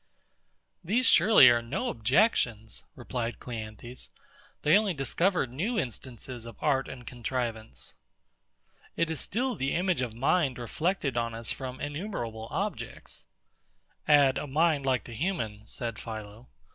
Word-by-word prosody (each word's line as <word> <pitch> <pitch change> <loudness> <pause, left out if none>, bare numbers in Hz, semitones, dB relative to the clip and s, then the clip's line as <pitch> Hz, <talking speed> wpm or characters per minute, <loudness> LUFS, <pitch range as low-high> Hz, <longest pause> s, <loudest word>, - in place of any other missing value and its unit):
These 225 +9 +2
surely 220 - +8
are 120 0 +2
no 140 - -2
objections, 115 - +1
replied 120 -2 -4
CLEANTHES; 115 +1 -7 0.5
they 150 - +6
only 205 -4 +3
discover 170 +5 +1
new 170 - -2
instances 120 - -5
of 115 - -9
art 135 -3 +1
and 125 -2 -9
contrivance. 120 -3 -4 1.0
It 165 -1 +1
is 160 - -2
still 250 +5 -1
the 135 - -1
image 175 -5 +1
of 120 -3 -3
mind 135 +2 +2
reflected 140 - -1
on 115 -1 -1
us 115 0 -2
from 130 -1 -5
innumerable 145 - -4
objects. - - -4 0.8
Add, 140 -3 +5
a - - -5
mind 150 -1 +2
like 130 -2 +2
the 120 - -9
human, 110 - -3
said 115 -2 -4
PHILO. 110 +1 -8
130 Hz, 135 wpm, -29 LUFS, 115-165 Hz, 1.0 s, surely